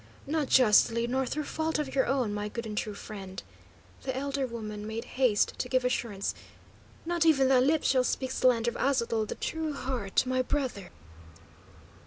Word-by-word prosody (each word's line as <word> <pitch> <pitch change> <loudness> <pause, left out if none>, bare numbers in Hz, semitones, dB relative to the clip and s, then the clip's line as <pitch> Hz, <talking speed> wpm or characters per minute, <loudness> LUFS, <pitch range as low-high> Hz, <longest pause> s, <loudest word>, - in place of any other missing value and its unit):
"Not 300 0 -1
justly, 235 -1 +5
nor 260 +2 0
through 305 +4 -2
fault 315 +2 -2
of 295 -3 -3
your 265 - +2
own, 255 -6 0
my 205 0 -3
good 235 +2 -5
and 215 -1 -5
true 210 0 -3
friend," 195 -2 -8 0.6
the 260 -1 -3
elder 275 -1 -1
woman 215 -3 -6
made 220 +1 -4
haste 250 -6 +2
to 250 - -2
give 255 -1 +1
assurance. 215 -5 -1 0.7
"Not 345 0 +1
even 275 -5 +4
thy 260 -1 +5
lips 295 +4 +2
shall 260 -2 +4
speak 260 +1 -1
slander 240 -3 +2
of - - -8
Aztotl 235 -5 +1
the - - -4
True 320 -2 -3
heart, 250 -8 -1
my 255 0 +1
brother." 255 -8 -2
255 Hz, 175 wpm, -29 LUFS, 220-275 Hz, 0.7 s, justly